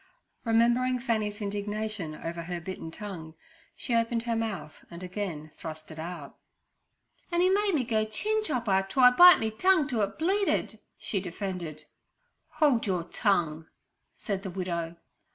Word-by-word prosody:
Remembering 240 +3 +3
Fanny's 220 -4 -1
indignation 205 -4 -3
over 170 +2 -5
her 175 +1 -4
bitten 170 -1 -6
tongue, 165 -3 -8 0.4
she 245 - -3
opened 230 0 +1
her 235 -1 -1
mouth 220 -8 -4
and 170 +1 -9
again 180 -5 -5
thrust 155 -1 -8
it 155 - -9
out. 165 -3 -7 0.9
'An' 345 +1 +2
'e 370 - +4
made 400 -2 +2
me 275 - +2
go 220 -2 +1
chin 430 - -1
chopper 230 - +1
to 265 - -3
I 250 -1 +9
bite 355 +7 +9
me 220 0 -1
tongue 340 - +3
to 235 -5 0
it 200 0 -2
bleeded' 385 +5 0 0.2
she 200 - -2
defended. 180 -4 -5 0.7
'Hold 280 -9 +3
your 180 -3 0
tongue!' 165 -5 0 0.5
said 200 -3 -3
the 195 - -5
widow. 170 -2 -3
205 Hz, 155 wpm, -28 LUFS, 175-240 Hz, 0.9 s, I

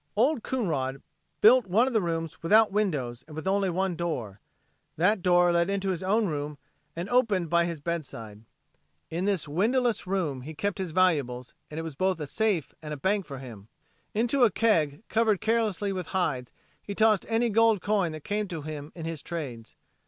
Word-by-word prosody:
Old 250 +5 +2
Coonrod 145 - -2 0.4
built 235 0 +6
one 210 +7 +4
of 265 - -2
the 220 - +3
rooms 165 -2 -3
without 215 +6 +5
windows 145 - -1
and 155 - -11
with 160 +4 -5
only 195 0 +2
one 185 +1 -1
door. 125 - -4 0.6
That 190 +5 +3
door 175 0 +4
led 170 +1 +2
into 195 -1 0
his 175 - -3
own 210 +4 +2
room 150 -3 -3 0.4
and 170 +3 -4
opened 210 -9 +1
by 170 0 +4
his 170 -2 -4
bedside. 130 -10 -5 0.7
In 170 +3 -2
this 195 -6 0
windowless 225 - +1
room 170 -9 -1
he 155 +5 -8
kept 200 +6 -2
his 185 -2 -2
valuables 140 -9 +1 0.2
and 155 - -6
it - - -3
was 160 -2 -5
both 185 +4 0
a 150 - -3
safe 195 - 0
and 150 -1 -5
a - - -10
bank 195 +5 0
for 140 -2 -7
him. 115 -6 -10 0.5
Into 240 +4 +2
a 235 - +7
keg 170 -6 +1
covered 220 -3 +2
carelessly 215 -3 0
with 185 -2 -4
hides 130 -9 -1 0.3
he 200 - -6
tossed 215 -3 +3
any 230 +1 +2
gold 225 -1 +4
coin 200 -4 +1
that 155 -1 -8
came 210 0 -1
to 165 -5 -6
him 150 -1 -7
in 165 -2 -6
his 165 -3 -4
trades. 135 -10 -6
180 Hz, 190 wpm, -27 LUFS, 150-210 Hz, 0.7 s, a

